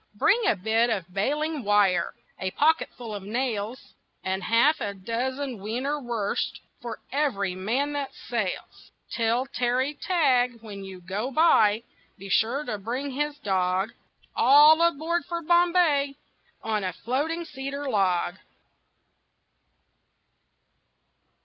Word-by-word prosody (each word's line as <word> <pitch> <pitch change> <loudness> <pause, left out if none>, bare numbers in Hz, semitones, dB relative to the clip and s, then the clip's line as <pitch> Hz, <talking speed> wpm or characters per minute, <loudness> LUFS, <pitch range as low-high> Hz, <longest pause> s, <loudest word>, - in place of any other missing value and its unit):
Bring 425 - +3
a - - +4
bit 220 +5 +1
of 185 -5 -3
bailing 295 +8 -1
wire, 200 -4 +2 0.2
A 190 - -1
pocketful 255 -4 0
of 205 - -5
nails, 225 +2 -3 0.3
And 190 +1 -2
half 235 +10 +3
a 200 -1 -3
dozen 250 +5 -3
wiener 250 +9 -2
wursts 230 -5 -2 0.2
For 235 -2 -6
every 230 -10 0
man 240 +11 -1
that 285 -2 -2
sails. 220 -6 -5 0.2
Tell 235 +2 +1
Terry 260 +1 0
Tagg, 255 -9 +1
when 200 -3 -8
you 190 -1 -9
go 195 +8 -3
by, 235 -8 +4 0.3
Be 195 0 -10
sure 235 +9 +2
to 215 -4 -4
bring 250 +7 -3
his 295 +2 -2
dog. 190 +1 0 0.4
All 300 +4 +7
aboard 340 +1 +1
for 340 -1 -4
Bombay 340 -4 +3 0.5
On 215 -2 -1
a 185 - -2
floating 310 +8 -2
cedar 280 -1 -5
log! 190 -5 +1
240 Hz, 120 wpm, -26 LUFS, 205-285 Hz, 0.5 s, All